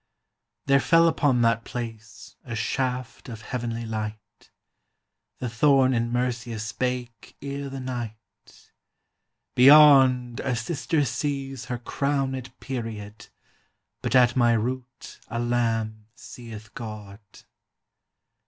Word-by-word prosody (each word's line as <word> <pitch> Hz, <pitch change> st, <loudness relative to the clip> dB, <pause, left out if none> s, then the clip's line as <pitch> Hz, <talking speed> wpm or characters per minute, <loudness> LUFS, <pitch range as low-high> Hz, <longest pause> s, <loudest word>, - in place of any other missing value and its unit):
There 140 Hz, 0 st, +4 dB
fell 165 Hz, +3 st, +4 dB
upon 140 Hz, -7 st, +2 dB
that 115 Hz, 0 st, +2 dB
place 115 Hz, -2 st, -8 dB
A 115 Hz, -, -6 dB
shaft 125 Hz, +2 st, -3 dB
of 110 Hz, -2 st, -8 dB
heavenly 115 Hz, -1 st, -4 dB
light; 105 Hz, -1 st, -7 dB, 0.9 s
The 125 Hz, -, -4 dB
thorn 130 Hz, +2 st, +3 dB
in 120 Hz, -1 st, 0 dB
Mercia 120 Hz, -1 st, -2 dB
spake 120 Hz, +2 st, -4 dB
Ere 140 Hz, 0 st, -5 dB
the 135 Hz, 0 st, -6 dB
night: 120 Hz, -4 st, -8 dB, 0.8 s
"Beyond, 130 Hz, -3 st, +7 dB
a 130 Hz, -2 st, -1 dB
sister 145 Hz, +4 st, -1 dB
sees 135 Hz, +1 st, -3 dB
Her 125 Hz, -, -3 dB
crownèd 135 Hz, 0 st, -2 dB
period, 110 Hz, -5 st, -6 dB, 0.7 s
But -, -, -1 dB
at 125 Hz, -1 st, +5 dB
my 120 Hz, -2 st, +4 dB
root 125 Hz, +3 st, -4 dB
a 115 Hz, -, -5 dB
lamb 115 Hz, -3 st, -1 dB
Seeth 110 Hz, -4 st, -11 dB
God." 105 Hz, -3 st, -8 dB
120 Hz, 105 wpm, -25 LUFS, 115-130 Hz, 0.9 s, Beyond